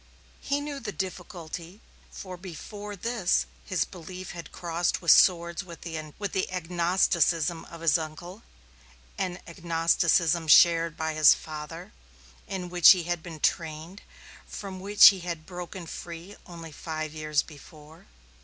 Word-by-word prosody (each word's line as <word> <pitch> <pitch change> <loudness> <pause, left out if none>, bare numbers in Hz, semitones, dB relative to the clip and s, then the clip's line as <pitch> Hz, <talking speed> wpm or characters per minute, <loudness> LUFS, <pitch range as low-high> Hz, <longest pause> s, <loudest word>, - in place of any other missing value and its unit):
He 285 +1 -1
knew 290 -1 -5
the 210 - -5
difficulty, 180 -1 -7 0.3
for 185 -2 -8
before 205 +4 -8
this 215 -2 0 0.2
his 185 - -1
belief 185 0 -9
had 170 -3 -9
crossed 170 0 -1
swords 170 +1 +5
with 170 -3 -12
the 165 +4 -4
agnosticism 170 -2 +1
of 170 -1 -12
his 165 -1 +3
uncle, 175 +6 -8 0.8
an 180 -2 -2
agnosticism 170 -1 +1
shared 165 +1 +5
by 160 0 -2
his 155 -1 +7
father, 155 +3 -8 0.6
in 185 -2 -5
which 175 +1 +8
he 180 -2 -3
had 175 0 -2
been 165 -3 -9
trained, 165 +4 -2 0.5
from 195 -2 -7
which 200 +2 +8
he 195 - -2
had 170 -3 -6
broken 180 0 -8
free 170 +4 -9
only 165 -2 -10
five 155 0 -5
years 155 -2 0
before. 155 0 -15
170 Hz, 130 wpm, -27 LUFS, 160-185 Hz, 0.8 s, which